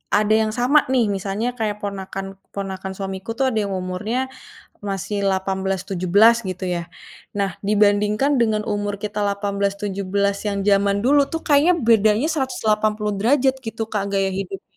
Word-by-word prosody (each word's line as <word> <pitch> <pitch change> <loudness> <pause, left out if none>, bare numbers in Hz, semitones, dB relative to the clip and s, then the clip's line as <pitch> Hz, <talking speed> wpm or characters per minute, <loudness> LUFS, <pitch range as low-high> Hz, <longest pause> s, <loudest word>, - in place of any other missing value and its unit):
ada 210 +1 +2
yang 220 0 +3
sama 255 +5 +4
nih 245 -5 +2
misalnya 200 +3 -2
kayak 210 -1 -2
ponakan-ponakan 195 -1 -6
suamiku 195 +3 -5
tuh 270 - +1
ada 220 - 0
yang 195 - -4
umurnya 210 +8 -3 0.5
masih 200 0 -3
18, 190 0 -1
17 195 +5 +4
gitu 185 +1 -6
ya. 170 - -3 0.5
Nah 200 -1 +1 0.2
dibandingkan 210 +5 +3
dengan 220 -2 +2
umur 205 -1 -1
kita 210 0 -4
18, 200 0 -1
17 200 0 -1
yang 200 -1 -1
zaman 200 0 +3
dulu 285 +3 +5
tuh 325 -1 -3
kayaknya 295 +4 +5
bedanya 220 +3 +4
180 215 -6 0
derajat 265 +4 +3
gitu, 225 0 -3
Kak, 210 -2 0
gaya 195 -1 +1
hidupnya. 195 0 -6
205 Hz, 145 wpm, -21 LUFS, 195-220 Hz, 0.5 s, dulu